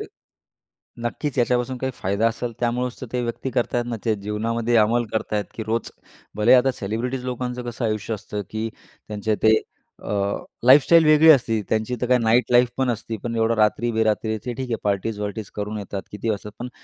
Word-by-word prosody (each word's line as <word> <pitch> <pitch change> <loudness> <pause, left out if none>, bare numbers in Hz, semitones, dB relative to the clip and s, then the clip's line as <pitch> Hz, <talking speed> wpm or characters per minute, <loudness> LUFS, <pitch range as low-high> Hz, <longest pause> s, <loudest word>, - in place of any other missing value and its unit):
तर - - -5 1.0
नक्कीच 135 +3 -3
याच्यापासून 125 +1 +1
काही 130 +1 -2
फायदा 100 +2 +1
असेल, 115 +1 -4
त्यामुळंच 125 +1 -1
तर 130 - -5
ते 125 - 0
व्यक्ती 120 +2 -3
करत 120 0 -1
आहेत 120 0 +1
ना, 120 -1 -3
ते 110 -2 +2
जीवनामध्ये 115 +3 -1
अंमल 115 +2 +3
करत 110 - -2
आहेत 105 -1 0
की 110 - -5
रोज 115 +1 -2 0.5
भले 110 +4 +5
आता 130 +1 +4
सेलिब्रिटीज 125 +5 -3
लोकांचं 125 0 -3
कसं 120 +1 -5
आयुष्य 110 0 -1
असतं, 105 0 -5
की 110 +1 -3 0.4
त्यांचे 105 +1 -1
ते, 110 0 +7 0.5
अ, - - -5 0.6
लाईफस्टाईल 150 +5 +7
वेगळी 155 +1 +7
असते. 115 -6 +4
त्यांची 110 +3 0
तर 125 - 0
काय 125 -1 +5
नाईट 115 +1 +3
लाईफ 120 0 +6
पण 130 -2 +2
असती 115 0 -4
पण 115 -1 -2
एवढं 115 +1 +2
रात्री-बेरात्री 110 0 +1
ते 125 - -1
ठीक 130 +1 -5
आहे 115 - +1
पार्टीज-वार्टीज 105 +1 -2
करून 105 +1 -3
येतात. 100 -1 -5
किती 105 +2 -2
वाजतात 105 0 -4
पण 125 - -5
115 Hz, 190 wpm, -23 LUFS, 110-125 Hz, 1.0 s, ते